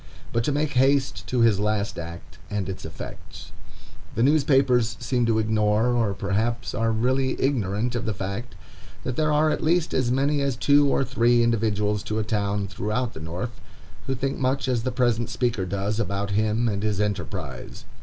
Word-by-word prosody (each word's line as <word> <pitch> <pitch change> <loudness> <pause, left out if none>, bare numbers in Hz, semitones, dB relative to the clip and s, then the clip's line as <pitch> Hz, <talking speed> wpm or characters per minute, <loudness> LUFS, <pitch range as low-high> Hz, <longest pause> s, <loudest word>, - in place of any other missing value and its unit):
But 115 - +1
to - - +1
make 150 +1 0
haste 135 +1 +2
to 125 -2 +1
his 110 -4 +4
last 105 -2 -1
act, 85 0 -9
and 105 -3 -2
its 95 -3 -6
effects. 80 - -9 0.6
The 115 - +2
newspapers 135 -6 +3
seem 120 0 0
to 115 -1 +2
ignore, 110 +1 +2
or 115 -5 +1
perhaps 110 +5 -1
are 115 +1 +1
really 130 +4 0
ignorant 115 -3 0
of 120 -1 -2
the 110 - -1
fact, 100 +6 -5 0.5
that 130 - -3
there 155 +1 +1
are 155 +1 +3
at - - -2
least 170 +1 +2
as 130 -2 +1
many 140 +3 +1
as 140 -2 0
two 145 +3 +4
or 135 - +2
three 120 -2 +3
individuals 105 -3 +1
to 110 - -2
a 110 - 0
town 105 -2 -1
throughout 105 +5 -2
the - - -8
North 90 +9 -5 0.5
who 135 - 0
think 135 +2 -2
much 135 +1 0
as 125 -3 +1
the 130 +2 -2
present 120 -2 +1
speaker 120 -6 -1
does 100 +3 -2
about 100 -1 -2
him 110 +3 +1
and 100 -3 -1
his 105 -2 -1
enterprise. 100 -11 -4
115 Hz, 185 wpm, -25 LUFS, 105-130 Hz, 0.6 s, his